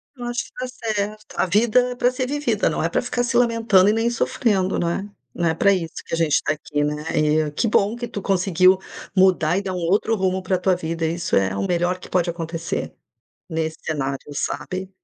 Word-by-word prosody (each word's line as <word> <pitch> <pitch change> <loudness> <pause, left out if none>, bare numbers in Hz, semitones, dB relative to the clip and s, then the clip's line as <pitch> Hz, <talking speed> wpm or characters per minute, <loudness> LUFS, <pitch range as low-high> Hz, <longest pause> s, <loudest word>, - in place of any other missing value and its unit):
Eu 245 - -9
acho 240 0 -2
que - - -17
tá 255 - -4
certo. 215 -4 -3
A - - +2
vida 235 +6 +3
é 245 - -5
pra 245 0 +2
ser 255 0 -2
vivida, 290 - 0
não - - -2
é - - +1
pra - - 0
ficar 245 - -1
se 240 0 -2
lamentando 225 -5 +4
e - - +3
nem 225 +1 +1
sofrendo, 210 -5 0
não 170 - 0
é? 195 +4 -3 0.3
Não 170 0 0
é - - +1
pra 200 +5 +3
isso 170 -4 -1
que - - -9
a - - -4
gente 165 -3 +2
tá 155 - 0
aqui, 145 -1 -2
né. 150 0 -2 0.4
E - - -5
que 190 +10 0
bom 210 +1 +2
que 240 0 -5
tu 200 - -6
conseguiu 185 -1 +3 0.4
mudar 185 -3 +4
e 200 - 0
dar 190 -2 -4
um - - -3
outro 190 +6 +1
rumo 190 -2 0
pra 185 0 0
tua 185 +1 +2
vida, 165 -1 -3
isso 170 +1 -1
é 95 0 +2
o 100 - -1
melhor 175 +1 0
que - - -12
pode 180 -1 +1
acontecer. 165 0 -4 0.6
Nesse 160 -1 -2
cenário, 140 -3 -2 0.2
sabe? 185 +5 -3
185 Hz, 230 wpm, -22 LUFS, 165-225 Hz, 0.6 s, lamentando